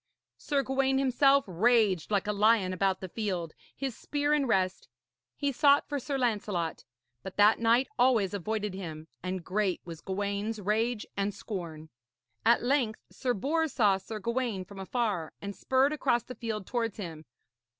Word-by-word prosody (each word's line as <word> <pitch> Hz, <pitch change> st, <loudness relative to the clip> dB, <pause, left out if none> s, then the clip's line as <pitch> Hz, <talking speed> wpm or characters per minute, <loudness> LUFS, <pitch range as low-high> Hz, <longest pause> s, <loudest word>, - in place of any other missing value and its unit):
Sir 280 Hz, -2 st, 0 dB
Gawaine 265 Hz, 0 st, +1 dB
himself 275 Hz, +1 st, +4 dB
raged 200 Hz, -2 st, +2 dB
like 205 Hz, -2 st, +1 dB
a 210 Hz, -, 0 dB
lion 210 Hz, -2 st, +3 dB
about 190 Hz, 0 st, 0 dB
the 190 Hz, -, -6 dB
field, 180 Hz, -6 st, -3 dB, 0.2 s
his 270 Hz, -4 st, -3 dB
spear 290 Hz, 0 st, -1 dB
in 290 Hz, -3 st, +2 dB
rest. 190 Hz, -4 st, 0 dB, 0.5 s
He 285 Hz, -1 st, 0 dB
sought 285 Hz, +1 st, +4 dB
for 290 Hz, -1 st, -2 dB
Sir 275 Hz, +2 st, -3 dB
Lancelot; 205 Hz, -9 st, -1 dB, 0.4 s
but 190 Hz, -, -8 dB
that 210 Hz, +2 st, +6 dB
knight 235 Hz, +3 st, +3 dB
always 235 Hz, -7 st, +3 dB
avoided 210 Hz, +1 st, -2 dB
him, 160 Hz, -5 st, -7 dB
and 185 Hz, -1 st, -4 dB
great 195 Hz, -1 st, 0 dB
was 165 Hz, -2 st, -8 dB
Gawaine's 200 Hz, +3 st, -2 dB
rage 215 Hz, +3 st, 0 dB
and 200 Hz, 0 st, -1 dB
scorn. 165 Hz, -6 st, -6 dB, 0.5 s
At -, -, +4 dB
length 245 Hz, -4 st, +1 dB
Sir 250 Hz, -2 st, -1 dB
Bors 315 Hz, +8 st, 0 dB
saw 205 Hz, -6 st, +4 dB
Sir 215 Hz, +3 st, -7 dB
Gawaine 230 Hz, -3 st, -2 dB
from 200 Hz, 0 st, -11 dB
afar, 195 Hz, -5 st, -2 dB
and 200 Hz, 0 st, -6 dB
spurred 265 Hz, +3 st, +2 dB
across 260 Hz, -5 st, +1 dB
the 255 Hz, -, -8 dB
field 220 Hz, -5 st, -4 dB
towards 230 Hz, -3 st, -2 dB
him. 165 Hz, -6 st, -7 dB
215 Hz, 160 wpm, -29 LUFS, 190-255 Hz, 0.5 s, that